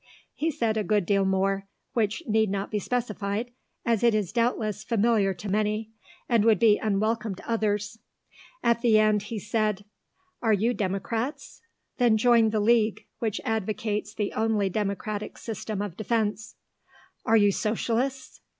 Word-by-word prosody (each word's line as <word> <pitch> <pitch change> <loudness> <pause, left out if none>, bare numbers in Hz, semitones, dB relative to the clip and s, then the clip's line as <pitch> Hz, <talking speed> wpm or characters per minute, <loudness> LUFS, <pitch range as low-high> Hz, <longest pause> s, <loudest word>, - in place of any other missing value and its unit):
He 320 - -1
said 230 -8 0
a 215 - +1
good 210 -3 +1
deal 195 +1 +2
more, 195 +1 0 0.3
which 220 +6 0
need 220 -1 +2
not 195 +1 -3
be 210 - 0
specified, 220 0 -2 0.3
as 230 -3 +2
it 235 -2 +4
is 200 -4 -1
doubtless 220 -3 0
familiar 220 -3 +2
to 175 +4 -8
many, 215 +2 -1 0.4
and 230 -4 +3
would 220 -2 +5
be 210 +1 +4
unwelcome 215 0 0
to - - -13
others. 210 -1 -1 0.6
At 235 0 +2
the 230 -3 +5
end 215 -1 +3
he 215 +2 -6
said, 210 -1 -1 0.6
"Are 225 -2 +3
you 220 +4 +2
Democrats? 225 +7 -3 0.4
Then 235 -3 +4
join 230 0 +4
the 215 0 0
League, 220 0 +2
which 220 -3 -1
advocates 215 -1 -2
the 210 -1 -2
only 215 -3 +1
democratic 210 +1 -3
system 215 -2 -4
of 200 -5 -6
defence. 215 -1 -1 0.7
Are 225 - +4
you 205 -1 +5
Socialists?" 235 +6 -2
215 Hz, 150 wpm, -26 LUFS, 205-230 Hz, 0.7 s, would